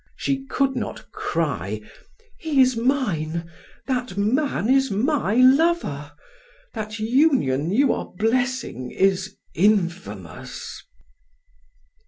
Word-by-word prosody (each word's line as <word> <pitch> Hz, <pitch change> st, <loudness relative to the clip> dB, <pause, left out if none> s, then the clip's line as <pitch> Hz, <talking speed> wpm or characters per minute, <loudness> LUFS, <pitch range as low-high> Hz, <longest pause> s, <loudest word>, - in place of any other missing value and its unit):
She 270 Hz, -1 st, -2 dB
could 270 Hz, -1 st, 0 dB
not 240 Hz, -, -5 dB
cry: 125 Hz, -, -2 dB, 0.6 s
"He 310 Hz, -4 st, 0 dB
is 255 Hz, -1 st, +5 dB
mine, 170 Hz, -, -1 dB, 0.3 s
that 250 Hz, -7 st, -2 dB
man 230 Hz, +3 st, +1 dB
is 270 Hz, +1 st, +3 dB
my 220 Hz, 0 st, +1 dB
lover. 255 Hz, -, +3 dB, 0.6 s
That 215 Hz, -1 st, -5 dB
union 220 Hz, -, +2 dB
you 255 Hz, +7 st, +3 dB
are -, -, -5 dB
blessing 230 Hz, -, -1 dB
is 190 Hz, 0 st, 0 dB, 0.2 s
infamous." 190 Hz, -2 st, -1 dB
225 Hz, 95 wpm, -23 LUFS, 180-270 Hz, 0.6 s, is